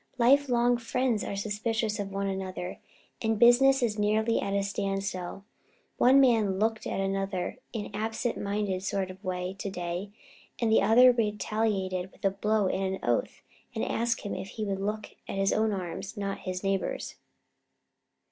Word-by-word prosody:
Life 270 Hz, +3 st, +4 dB
long 240 Hz, 0 st, +3 dB
friends 240 Hz, -1 st, 0 dB
are -, -, -4 dB
suspicious 215 Hz, +1 st, -1 dB
of 200 Hz, -1 st, -3 dB
one 195 Hz, 0 st, -2 dB
another 190 Hz, -2 st, -4 dB, 0.4 s
and 225 Hz, -1 st, +1 dB
business 255 Hz, +3 st, +6 dB
is 215 Hz, -3 st, 0 dB
nearly 220 Hz, +2 st, +2 dB
at 195 Hz, -, -2 dB
a 200 Hz, -, +1 dB
standstill. 195 Hz, -1 st, -3 dB, 0.5 s
One 260 Hz, +3 st, +6 dB
man 225 Hz, -7 st, +4 dB
looked 220 Hz, +2 st, 0 dB
at -, -, -2 dB
another 195 Hz, -1 st, -2 dB
in 215 Hz, -3 st, -4 dB
an -, -, -10 dB
absent 225 Hz, +3 st, -2 dB
minded 200 Hz, -2 st, -2 dB
sort 195 Hz, -1 st, -2 dB
of 190 Hz, +2 st, -15 dB
a -, -, -8 dB
way 180 Hz, 0 st, -2 dB
to 200 Hz, -, -3 dB
day, 180 Hz, +1 st, -4 dB, 0.5 s
and 230 Hz, -2 st, +1 dB
the 220 Hz, -, +5 dB
other 240 Hz, +5 st, +7 dB
retaliated 210 Hz, -4 st, -1 dB
with -, -, -9 dB
a 195 Hz, -, +4 dB
blow 210 Hz, +1 st, +1 dB
and 190 Hz, 0 st, -1 dB
an -, -, -9 dB
oath, -, -, 0 dB, 0.3 s
and 220 Hz, -, -1 dB
asked 235 Hz, 0 st, 0 dB
him 205 Hz, -, -4 dB
if -, -, -5 dB
he 215 Hz, +2 st, -5 dB
would 195 Hz, -1 st, -2 dB
look 210 Hz, +1 st, -3 dB, 0.2 s
at -, -, -4 dB
his 195 Hz, 0 st, +2 dB
own 220 Hz, 0 st, +2 dB
arms 190 Hz, +2 st, -5 dB
not 200 Hz, -1 st, -3 dB
his 185 Hz, +1 st, -3 dB
neighbor's." 195 Hz, -1 st, -1 dB
205 Hz, 175 wpm, -28 LUFS, 195-225 Hz, 0.5 s, other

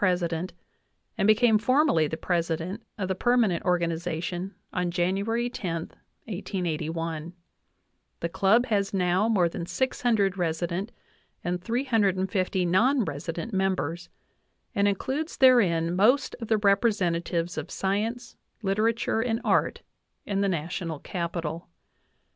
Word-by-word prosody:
president 180 Hz, -2 st, 0 dB, 0.6 s
and 195 Hz, -, +1 dB
became 215 Hz, 0 st, +5 dB
formally 255 Hz, -, +3 dB
the 160 Hz, -, -4 dB
president 170 Hz, +4 st, -2 dB, 0.2 s
of 195 Hz, -3 st, -2 dB
the 190 Hz, -, 0 dB
perma 240 Hz, +3 st, +3 dB
nent 175 Hz, -5 st, -1 dB
organization 175 Hz, +1 st, -2 dB, 0.2 s
on 180 Hz, -1 st, 0 dB
January 195 Hz, +7 st, 0 dB
10, 170 Hz, -9 st, -4 dB, 0.4 s
i88i.l 165 Hz, -4 st, -3 dB, 0.9 s
The 170 Hz, -, 0 dB
club 195 Hz, +7 st, +3 dB
has 200 Hz, -4 st, 0 dB
now 185 Hz, +3 st, +2 dB
more 190 Hz, -6 st, +3 dB
than 170 Hz, 0 st, -5 dB
600 200 Hz, -2 st, +1 dB
resident 175 Hz, +5 st, -2 dB, 0.5 s
and 180 Hz, +1 st, -2 dB
350 195 Hz, -6 st, +1 dB
non 235 Hz, +8 st, +3 dB
resident 165 Hz, +7 st, -5 dB
members, 185 Hz, -3 st, -1 dB, 0.6 s
and 200 Hz, 0 st, +2 dB
includes 270 Hz, -, -2 dB
therein 180 Hz, -11 st, +4 dB
most 245 Hz, +9 st, +3 dB
of 230 Hz, -, -4 dB
the 220 Hz, -, +3 dB
representatives 185 Hz, -5 st, +1 dB
of 155 Hz, -, -5 dB
science, 220 Hz, +5 st, -2 dB, 0.3 s
litera 215 Hz, +4 st, +2 dB
ture, 225 Hz, -1 st, -1 dB
and 225 Hz, -1 st, 0 dB
art -, -, +1 dB, 0.4 s
in 200 Hz, -1 st, -1 dB
the 200 Hz, -, +2 dB
National 165 Hz, -1 st, -3 dB
Capital. 170 Hz, 0 st, -4 dB
190 Hz, 120 wpm, -27 LUFS, 170-220 Hz, 0.9 s, became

